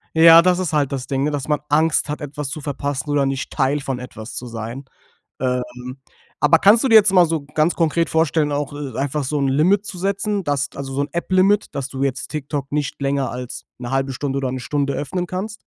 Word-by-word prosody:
Ja, 165 Hz, +1 st, +9 dB
das 180 Hz, +1 st, +2 dB
ist 175 Hz, -4 st, -2 dB
halt 145 Hz, -3 st, +1 dB
das 135 Hz, -2 st, -4 dB
Ding, 135 Hz, -1 st, -1 dB
ne, 150 Hz, -, 0 dB
dass 145 Hz, -1 st, -3 dB
man 150 Hz, -1 st, +1 dB
Angst 155 Hz, +1 st, +2 dB
hat 150 Hz, -, -4 dB
etwas 145 Hz, -1 st, -5 dB
zu 155 Hz, -, -6 dB
verpassen 145 Hz, 0 st, -3 dB
oder 145 Hz, -1 st, +2 dB
nicht 135 Hz, -1 st, -3 dB
Teil 140 Hz, +1 st, +1 dB
von 135 Hz, -2 st, -3 dB
etwas 120 Hz, -2 st, -9 dB
zu 125 Hz, -, -5 dB
sein. 115 Hz, +4 st, -6 dB, 0.5 s
Ähm, 125 Hz, 0 st, -3 dB, 0.4 s
aber 155 Hz, +3 st, +5 dB
kannst 210 Hz, +5 st, +5 dB
du -, -, +3 dB
dir 225 Hz, -, +5 dB
jetzt 210 Hz, -2 st, +7 dB
mal 180 Hz, -2 st, +7 dB
so 165 Hz, -2 st, -1 dB
ganz 155 Hz, +3 st, +2 dB
konkret 165 Hz, -1 st, +1 dB
vorstellen, 160 Hz, -2 st, +1 dB
auch, 145 Hz, 0 st, -2 dB
äh, 140 Hz, -5 st, -6 dB
einfach 140 Hz, +1 st, -1 dB
so 145 Hz, +3 st, -1 dB
'n 140 Hz, -, +1 dB
Limit 180 Hz, +10 st, +2 dB
zu 185 Hz, -, -7 dB
setzen, 200 Hz, +2 st, -1 dB
dass 145 Hz, -2 st, -1 dB
also, 135 Hz, -1 st, -6 dB
so 140 Hz, -, 0 dB
'n 145 Hz, -, -3 dB
App-Limit, 185 Hz, +4 st, +2 dB
dass 135 Hz, -1 st, -3 dB
du 135 Hz, 0 st, -3 dB
jetzt 130 Hz, -1 st, -2 dB
TikTok 145 Hz, -2 st, -4 dB
nicht 145 Hz, -1 st, -2 dB
länger 135 Hz, -2 st, 0 dB
als 125 Hz, 0 st, -7 dB
1/2 135 Hz, +2 st, -2 dB
Stunde 140 Hz, +1 st, -3 dB
oder 130 Hz, -2 st, -1 dB
1 130 Hz, -, -4 dB
Stunde 140 Hz, +2 st, -1 dB
öffnen 175 Hz, +5 st, -3 dB
kannst. 205 Hz, +5 st, -5 dB
145 Hz, 225 wpm, -20 LUFS, 135-165 Hz, 0.5 s, Ja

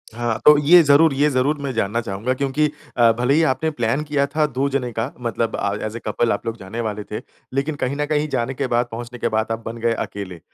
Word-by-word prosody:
हाँ, 120 Hz, -1 st, -1 dB
अ, 150 Hz, -, +11 dB
ये 175 Hz, +2 st, +8 dB
ज़रूर 145 Hz, +1 st, +5 dB
ये 145 Hz, +2 st, +3 dB
ज़रूर 140 Hz, +3 st, +1 dB
मैं 140 Hz, -1 st, -2 dB
जानना 115 Hz, +1 st, 0 dB
चाहूँगा 110 Hz, +4 st, -2 dB
क्योंकि 140 Hz, +3 st, 0 dB, 0.3 s
अ, 115 Hz, -1 st, +6 dB
भले 125 Hz, +3 st, +2 dB
ही 165 Hz, +2 st, +4 dB
आपने 160 Hz, +4 st, -1 dB
प्लान 120 Hz, +1 st, -1 dB
किया 145 Hz, -2 st, 0 dB
था 155 Hz, -1 st, +3 dB
दो 135 Hz, 0 st, -1 dB
जने 130 Hz, -3 st, -2 dB
का 115 Hz, 0 st, -3 dB
मतलब 115 Hz, -1 st, -1 dB
अ, 100 Hz, 0 st, -1 dB
एज़ 110 Hz, +1 st, -5 dB
अ -, -, -7 dB
कपल 115 Hz, +2 st, +1 dB
आप 100 Hz, -, -2 dB
लोग 115 Hz, 0 st, -3 dB
जाने 100 Hz, +4 st, -6 dB
वाले 105 Hz, -2 st, -3 dB
थे। 105 Hz, -, -4 dB, 0.3 s
लेकिन 140 Hz, +3 st, -1 dB
कहीं 140 Hz, 0 st, -2 dB
न 150 Hz, 0 st, -1 dB
कहीं 150 Hz, 0 st, 0 dB
जाने 130 Hz, 0 st, -1 dB
के 135 Hz, 0 st, -2 dB
बाद, 120 Hz, 0 st, +1 dB
पहुँचने 120 Hz, +1 st, -7 dB
के -, -, 0 dB
बाद 110 Hz, +1 st, -1 dB
आप 115 Hz, 0 st, -3 dB
बन 115 Hz, +1 st, -5 dB
गए 115 Hz, 0 st, +2 dB
अकेले। 95 Hz, -5 st, -5 dB
125 Hz, 250 wpm, -21 LUFS, 115-140 Hz, 0.3 s, अ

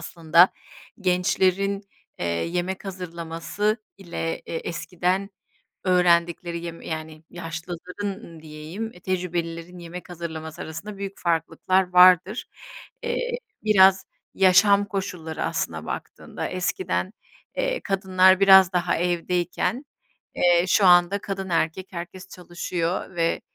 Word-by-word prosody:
aslında 165 Hz, +2 st, +4 dB, 0.5 s
gençlerin, 190 Hz, +2 st, +1 dB, 0.4 s
eee, -, -, -2 dB
yemek 175 Hz, -, -2 dB
hazırlaması 180 Hz, +3 st, -3 dB, 0.2 s
ile 170 Hz, -3 st, -3 dB
e -, -, -6 dB
eskiden 180 Hz, +3 st, -2 dB, 0.5 s
öğrendikleri 170 Hz, -2 st, +2 dB
yem 165 Hz, -1 st, -7 dB
yani, 155 Hz, 0 st, -6 dB
yaşlıların 175 Hz, +3 st, -6 dB
ın 165 Hz, -7 st, -12 dB
diyeyim 160 Hz, +9 st, -7 dB
tecrübelilerin 175 Hz, -1 st, -4 dB
yemek 175 Hz, +1 st, -9 dB
hazırlaması 160 Hz, -1 st, -6 dB
arasında 195 Hz, +7 st, -7 dB
büyük 195 Hz, 0 st, -6 dB
farklılıklar 175 Hz, +2 st, 0 dB
vardır. 185 Hz, +4 st, +6 dB, 0.6 s
Eee, 480 Hz, +1 st, -2 dB, 0.3 s
biraz 190 Hz, -3 st, +5 dB, 0.3 s
yaşam 200 Hz, +2 st, +5 dB
koşulları, 180 Hz, -5 st, -4 dB
aslına -, -, -3 dB
baktığında, -, -, -6 dB
eskiden, 185 Hz, -, -2 dB, 0.4 s
eee, -, -, -1 dB
kadınlar 190 Hz, -1 st, +4 dB
biraz 190 Hz, -2 st, +7 dB
daha 180 Hz, -1 st, +1 dB
evdeyken, 175 Hz, -, -1 dB, 0.5 s
eee, 175 Hz, -1 st, +4 dB
şu 200 Hz, -, +4 dB
anda 175 Hz, +2 st, +5 dB
kadın 195 Hz, -1 st, -5 dB
erkek 170 Hz, +2 st, 0 dB
herkes 180 Hz, +2 st, -8 dB
çalışıyor 175 Hz, 0 st, -4 dB
ve, 165 Hz, 0 st, +1 dB
180 Hz, 105 wpm, -24 LUFS, 170-190 Hz, 0.6 s, biraz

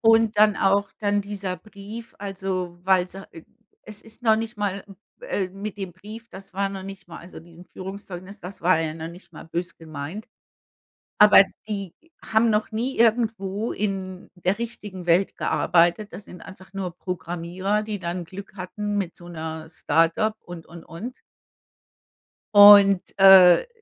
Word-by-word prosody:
Und 225 Hz, -1 st, +4 dB
dann 210 Hz, -1 st, +5 dB
auch 200 Hz, +1 st, +2 dB
dann 205 Hz, -1 st, +1 dB
dieser 200 Hz, -2 st, -5 dB
Brief, 215 Hz, +4 st, -11 dB
also, 190 Hz, -3 st, -4 dB
weil 185 Hz, -1 st, +3 dB
sie 190 Hz, -, -10 dB
äh, 165 Hz, -, -11 dB, 0.4 s
es 215 Hz, -1 st, -10 dB
ist 225 Hz, +2 st, -13 dB
noch 220 Hz, -2 st, +4 dB
nicht 225 Hz, 0 st, -5 dB
mal 200 Hz, -1 st, -2 dB
m 195 Hz, -, -14 dB, 0.2 s
äh, 205 Hz, -, -2 dB
mit 195 Hz, +2 st, -7 dB
dem 190 Hz, -4 st, -6 dB
Brief, 215 Hz, +5 st, -11 dB
das 195 Hz, 0 st, -12 dB
war 195 Hz, +1 st, 0 dB
noch 195 Hz, -1 st, -7 dB
nicht 195 Hz, -1 st, -10 dB
mal 170 Hz, -, -9 dB
also, 175 Hz, -, -12 dB
diesem 170 Hz, +1 st, -16 dB
Führungszeugnis, 190 Hz, 0 st, -9 dB
das 180 Hz, +1 st, -10 dB
war 180 Hz, -1 st, +4 dB
ja 155 Hz, -1 st, -3 dB
noch 160 Hz, 0 st, -7 dB
nicht 175 Hz, +3 st, -14 dB
mal -, -, -11 dB
böse 170 Hz, +2 st, -4 dB
gemeint. 160 Hz, +5 st, -8 dB, 0.9 s
Aber 210 Hz, -1 st, +9 dB, 0.3 s
die 200 Hz, -4 st, -5 dB, 0.3 s
haben 225 Hz, +1 st, +2 dB
noch 215 Hz, +1 st, 0 dB
nie 240 Hz, +4 st, -3 dB
irgendwo 225 Hz, -2 st, +1 dB
in 190 Hz, -3 st, -4 dB
der 185 Hz, +3 st, -1 dB
richtigen 205 Hz, -5 st, -7 dB
Welt 175 Hz, +3 st, +2 dB
gearbeitet. 175 Hz, +4 st, +1 dB
Das 205 Hz, -, -9 dB
sind 180 Hz, -, -13 dB
einfach 190 Hz, 0 st, -13 dB
nur 185 Hz, -3 st, -5 dB
Programmierer, 180 Hz, +3 st, -3 dB
die 210 Hz, -1 st, -5 dB
dann 175 Hz, 0 st, -4 dB
Glück 195 Hz, +3 st, -11 dB
hatten 205 Hz, +3 st, -4 dB
mit 180 Hz, -4 st, -4 dB
so 175 Hz, -, -11 dB
'ner 160 Hz, -1 st, -7 dB
Start-up 165 Hz, +8 st, +1 dB
und, 175 Hz, -2 st, -10 dB
und, 170 Hz, 0 st, -12 dB
und. 215 Hz, +11 st, -9 dB, 1.3 s
Und 205 Hz, -2 st, +9 dB, 0.2 s
äh, 190 Hz, -, +8 dB
195 Hz, 165 wpm, -24 LUFS, 175-210 Hz, 1.3 s, Aber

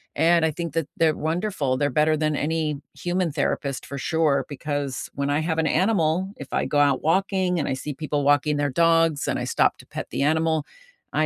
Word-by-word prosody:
and 165 Hz, +2 st, +4 dB
I 160 Hz, -, +1 dB
think 170 Hz, 0 st, -5 dB
that 165 Hz, -2 st, -1 dB
they're 160 Hz, -2 st, +3 dB
wonderful. 160 Hz, -4 st, -1 dB
They're 145 Hz, +2 st, +1 dB
better 155 Hz, +3 st, +2 dB
than 155 Hz, 0 st, 0 dB
any 155 Hz, -2 st, -1 dB, 0.2 s
human 175 Hz, -1 st, -1 dB
therapist 140 Hz, -2 st, -2 dB
for 140 Hz, -, -7 dB
sure 155 Hz, 0 st, +1 dB
because 145 Hz, -1 st, -4 dB
when 140 Hz, 0 st, -1 dB
I 145 Hz, +1 st, +1 dB
have 160 Hz, 0 st, -1 dB
an 160 Hz, -, +1 dB
animal, 185 Hz, +1 st, +1 dB
if 140 Hz, -, -9 dB
I -, -, +1 dB
go 145 Hz, -, +1 dB
out 140 Hz, -2 st, +3 dB
walking 185 Hz, +1 st, +1 dB
and 145 Hz, -, -1 dB
I -, -, 0 dB
see 140 Hz, +3 st, -5 dB
people 145 Hz, 0 st, -2 dB
walking 145 Hz, +1 st, +3 dB
their 145 Hz, 0 st, 0 dB
dogs 165 Hz, 0 st, +2 dB
and -, -, 0 dB
I -, -, -3 dB
stop -, -, +2 dB
to -, -, -14 dB
pet -, -, -6 dB
the -, -, -1 dB
animal, 160 Hz, 0 st, +1 dB, 0.5 s
I -, -, +2 dB
155 Hz, 215 wpm, -24 LUFS, 145-165 Hz, 0.5 s, and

